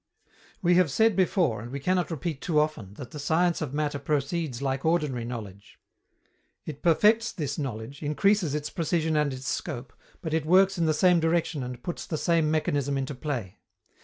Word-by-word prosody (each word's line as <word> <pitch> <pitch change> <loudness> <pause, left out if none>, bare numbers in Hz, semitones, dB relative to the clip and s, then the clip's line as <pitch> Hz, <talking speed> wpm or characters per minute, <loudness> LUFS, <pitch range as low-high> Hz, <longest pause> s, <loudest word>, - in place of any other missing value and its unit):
We 175 0 +4
have 180 -4 +4
said 220 +9 +3
before, 175 - +2
and 120 - -8
we 140 +3 -5
cannot 180 +4 0
repeat 160 -2 -4
too 155 -4 +1
often, 115 -11 -2
that 125 -2 -9
the 150 - -7
science 165 +4 +1
of 150 -5 -3
matter 145 0 -1
proceeds 145 -1 -1
like 135 -1 -2
ordinary 150 -8 0
knowledge. 105 -5 -8 0.9
It 145 -2 -7
perfects 215 +7 +4
this 145 -3 -4
knowledge, 130 0 -5
increases 165 +2 +2
its 150 0 -3
precision 160 -1 0
and 150 -2 +2
its 130 0 -7
scope, 120 0 -4 0.3
but 160 -2 -3
it 160 -2 +1
works 185 +3 +4
in 165 - +2
the 155 - +2
same 180 +2 +4
direction 165 -2 0
and 125 -1 -6
puts 175 - -5
the 155 - -2
same 165 -1 +2
mechanism 145 -3 0
into 135 +1 -3
play. 125 -8 -5
150 Hz, 185 wpm, -27 LUFS, 135-170 Hz, 0.9 s, We